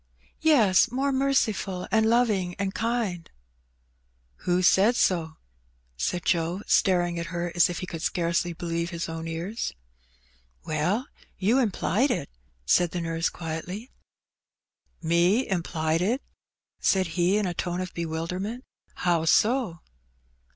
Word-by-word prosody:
^^ -, -, -42 dB, 0.4 s
"Yes; 235 Hz, -, +4 dB
more 270 Hz, +3 st, 0 dB
merciful, 220 Hz, -9 st, 0 dB
and 220 Hz, 0 st, +3 dB
loving, 210 Hz, -7 st, +2 dB
and 195 Hz, -1 st, -2 dB
kind/* 220 Hz, -5 st, -1 dB, 1.1 s
*^ -, -, -25 dB
Who 180 Hz, +1 st, +2 dB
said 200 Hz, +6 st, +5 dB
so? 165 Hz, -7 st, +1 dB, 0.3 s
*' -, -, -38 dB, 0.2 s
said 175 Hz, -, -2 dB
Joe, 175 Hz, +3 st, 0 dB
staring 175 Hz, -3 st, +2 dB
at 170 Hz, -, -4 dB
her 175 Hz, -1 st, -3 dB
as 175 Hz, +1 st, +4 dB
if 175 Hz, -, -4 dB
he -, -, -3 dB
could 165 Hz, -3 st, -7 dB
scarcely 170 Hz, 0 st, 0 dB
believe 170 Hz, 0 st, -3 dB
his 170 Hz, -2 st, -4 dB
own 165 Hz, 0 st, -5 dB
ears. 170 Hz, -, -4 dB, 0.9 s
WeD, 175 Hz, +10 st, 0 dB, 0.3 s
you 215 Hz, +8 st, +2 dB
implied 240 Hz, +2 st, +1 dB
it/* 235 Hz, -, -1 dB, 0.4 s
said 175 Hz, -, +3 dB
the 175 Hz, +1 st, -4 dB
nurse, 165 Hz, 0 st, -1 dB
quietly. 175 Hz, +8 st, -6 dB, 1.1 s
Me 175 Hz, +9 st, +3 dB
implied 165 Hz, -3 st, -1 dB
it? 235 Hz, +9 st, 0 dB, 0.6 s
said 190 Hz, -3 st, +2 dB
he 175 Hz, +4 st, +2 dB
in 210 Hz, -, 0 dB
a 180 Hz, -, -1 dB
tone 175 Hz, +1 st, -3 dB
of 185 Hz, 0 st, -4 dB
bewilderment. 175 Hz, +8 st, -4 dB, 0.3 s
*'How 170 Hz, -2 st, +1 dB
so? 215 Hz, -1 st, +2 dB
180 Hz, 135 wpm, -26 LUFS, 170-215 Hz, 1.1 s, said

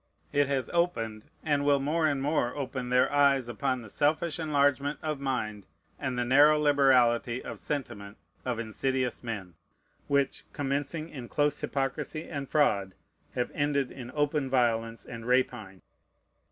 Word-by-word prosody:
It 145 Hz, -1 st, +3 dB
has 135 Hz, -3 st, -1 dB
opened, 115 Hz, -12 st, 0 dB, 0.2 s
and 145 Hz, -3 st, +1 dB
will 145 Hz, -1 st, +4 dB
more 155 Hz, +4 st, +1 dB
and 140 Hz, -3 st, 0 dB
more 140 Hz, -4 st, 0 dB
open, 130 Hz, -3 st, -4 dB
their 125 Hz, +2 st, +3 dB
eyes 140 Hz, -3 st, +4 dB
upon 130 Hz, +1 st, -2 dB
the -, -, -10 dB
selfish 155 Hz, +7 st, 0 dB
enlargement 145 Hz, -2 st, +1 dB
of 155 Hz, -2 st, -2 dB
mind 110 Hz, -, -3 dB, 0.3 s
and 130 Hz, -3 st, -2 dB
the 120 Hz, -, 0 dB
narrow 145 Hz, +4 st, +6 dB
liberality 130 Hz, -5 st, +3 dB
of -, -, -6 dB
sentiment 100 Hz, -8 st, -5 dB, 0.3 s
of 125 Hz, -2 st, -2 dB
insidious 125 Hz, +3 st, -2 dB
men, 100 Hz, -7 st, -5 dB, 0.5 s
which, 140 Hz, -1 st, +1 dB
commencing 145 Hz, +3 st, -2 dB
in 130 Hz, -6 st, -8 dB
close 145 Hz, 0 st, +1 dB
hypocrisy 140 Hz, +3 st, -2 dB
and 140 Hz, -2 st, -5 dB
fraud, 100 Hz, -11 st, +2 dB, 0.4 s
have 125 Hz, -, -1 dB
ended 145 Hz, -2 st, 0 dB
in 125 Hz, -3 st, -8 dB
open 145 Hz, -2 st, 0 dB
violence 115 Hz, -4 st, 0 dB
and 115 Hz, 0 st, -8 dB
rapine. 120 Hz, -7 st, 0 dB
135 Hz, 145 wpm, -29 LUFS, 120-145 Hz, 0.5 s, narrow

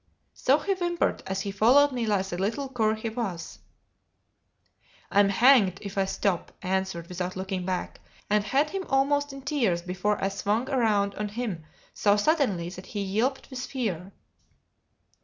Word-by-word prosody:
So 270 Hz, +3 st, +3 dB
he 390 Hz, +6 st, 0 dB
whimpered 345 Hz, -2 st, -1 dB
as 190 Hz, 0 st, -2 dB
he 200 Hz, -, -3 dB
followed 255 Hz, +9 st, +5 dB
me 240 Hz, -3 st, -2 dB
like 200 Hz, -3 st, +1 dB
the 175 Hz, -2 st, -5 dB
little 230 Hz, +9 st, -1 dB
cur 220 Hz, -4 st, +1 dB
he 220 Hz, +1 st, -4 dB
was. 215 Hz, -7 st, -5 dB, 1.5 s
"I'm 200 Hz, 0 st, +5 dB
hanged 210 Hz, -3 st, +5 dB
if 200 Hz, -1 st, -7 dB
I 195 Hz, -1 st, +2 dB
stop," 190 Hz, -2 st, -1 dB
I 185 Hz, -, -4 dB
answered 190 Hz, -3 st, -1 dB
without 180 Hz, +1 st, -4 dB
looking 190 Hz, -1 st, -4 dB
back; 185 Hz, -1 st, -3 dB, 0.3 s
and 210 Hz, 0 st, +2 dB
had 275 Hz, +8 st, +1 dB
him 390 Hz, +1 st, -3 dB
almost 285 Hz, +1 st, +2 dB
in 275 Hz, 0 st, -9 dB
tears 235 Hz, -, 0 dB
before 185 Hz, +3 st, -1 dB
I 195 Hz, -, +2 dB
swung 205 Hz, +4 st, -1 dB
round 220 Hz, -7 st, +1 dB
on 210 Hz, +1 st, -3 dB
him 205 Hz, -7 st, -4 dB, 0.3 s
so 205 Hz, 0 st, +3 dB
suddenly 205 Hz, -, +1 dB
that 185 Hz, +1 st, -10 dB
he 205 Hz, -, -4 dB
yelped 230 Hz, +9 st, -1 dB
with 250 Hz, -1 st, -5 dB
fear. 200 Hz, -, -3 dB
210 Hz, 165 wpm, -27 LUFS, 190-260 Hz, 1.5 s, followed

